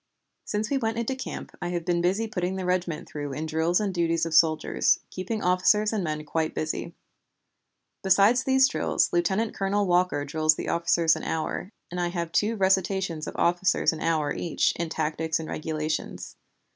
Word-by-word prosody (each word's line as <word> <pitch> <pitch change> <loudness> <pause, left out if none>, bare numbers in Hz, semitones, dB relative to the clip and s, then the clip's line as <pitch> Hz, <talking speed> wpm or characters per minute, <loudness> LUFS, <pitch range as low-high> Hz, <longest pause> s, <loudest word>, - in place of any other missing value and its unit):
Since 210 +3 -2
we 275 - +2
went 225 -2 -1
into 235 +3 -1
camp 260 - -7
I 175 - -2
have 175 -1 -3
been 175 -1 +1 0.3
putting 180 -1 -2
the 190 -1 -4
regiment 180 -3 -1
through 145 -2 -5
in 150 +3 -4
drill 160 +2 0
and 205 -3 -1
duties 165 -1 +1
of 165 - -4
soldiers, 155 0 +3
keeping 200 +4 -4
officers 210 +4 +3
and 210 -4 -1
men 155 -2 -3
quite 160 +1 -2
busy. 155 +2 -3 1.1
Besides 200 +6 +4
these 265 0 +4
drills, - - 0
Lieutenant 190 +6 +1
Colonel 200 +1 0
Walker 180 -5 +1
drills 155 +1 +2
the - - -4
officers 170 -1 +2
an - - -6
hour, 160 +4 -3 0.2
and 180 - -4
I 175 - +1
have 170 -1 -3
two 215 +5 +1
recitations 190 -4 0
of - - -6
officers 175 0 +2
an 160 - -7
hour 155 -3 0
each 170 - 0
in 170 -1 -3
Tactics 160 0 -1
and 160 - -6
Regulations. 155 0 -4
175 Hz, 175 wpm, -26 LUFS, 160-195 Hz, 1.1 s, Besides